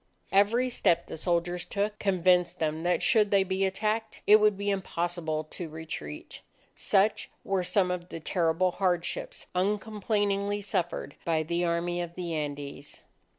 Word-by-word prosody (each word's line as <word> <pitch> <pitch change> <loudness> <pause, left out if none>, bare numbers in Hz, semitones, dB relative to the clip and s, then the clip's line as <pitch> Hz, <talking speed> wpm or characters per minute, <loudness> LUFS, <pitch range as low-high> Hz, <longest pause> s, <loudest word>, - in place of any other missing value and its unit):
Every 215 +6 +4
step 170 -8 +2
the - - -7
soldiers 175 +1 0
took, 210 +1 -2
convinced 180 -2 +2
them 160 -1 -1
that 175 +1 +1
should 215 -4 +4
they 200 -1 +4
be 190 +1 0
attacked, 215 +3 -2
it 210 - +8
would 210 -2 +3
be 200 0 -1
impossible 175 -4 -2
to 170 -3 -6
retreat. 155 - -7 0.3
Such 200 +3 +2
were 195 -2 0
some 180 +1 +2
of 180 0 -4
the 165 - -6
terrible 170 +2 +1
hardships 175 -2 -1
uncomplainingly 205 +1 0
suffered 175 -7 -2
by 160 -2 +1
the 170 +2 -1
Army 175 +1 0
of 170 0 -6
the 175 -2 -4
Andes. 145 -2 -5
180 Hz, 150 wpm, -28 LUFS, 170-200 Hz, 0.3 s, it